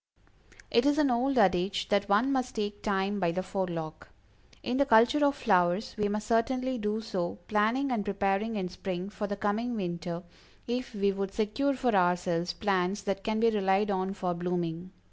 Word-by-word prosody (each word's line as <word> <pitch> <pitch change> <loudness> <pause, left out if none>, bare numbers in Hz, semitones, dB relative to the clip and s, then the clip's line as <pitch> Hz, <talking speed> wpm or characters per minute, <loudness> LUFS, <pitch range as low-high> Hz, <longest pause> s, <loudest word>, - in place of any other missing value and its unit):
It 240 +4 +4
is 290 +1 +3
an 295 -4 +3
old 255 +3 +1
adage 190 -2 +2
that 200 0 +1
one 215 +7 +3
must 255 -2 -1
take 205 -1 -3
Time 200 0 0
by 175 -3 +1
the 185 +2 -2
forelock. 175 -5 -4 0.5
In 245 - -1
the 280 - +4
culture 240 +5 +5
of 280 -1 +3
flowers, 185 0 +1
we 210 -2 0
must 210 +1 -2
certainly 255 +3 0
do 210 +1 -1
so, 185 -6 -3
planning 225 +6 +1
and 230 -4 0
preparing 200 +2 -1
in 190 -3 -2
spring 185 +1 -5
for 205 0 -4
the 205 0 -4
coming 220 +4 -1
winter, 175 -3 -4 0.4
if 245 -1 -3
we 200 0 +2
would 195 0 -4
secure 270 +6 0
for 255 -3 0
ourselves 175 -1 +1
plants 190 +1 -1
that 195 -1 -2
can 220 -1 -1
be 230 0 +4
relied 200 0 +1
on 190 0 -1
for 180 -3 -2
blooming. 175 0 -3
205 Hz, 185 wpm, -29 LUFS, 185-230 Hz, 0.5 s, culture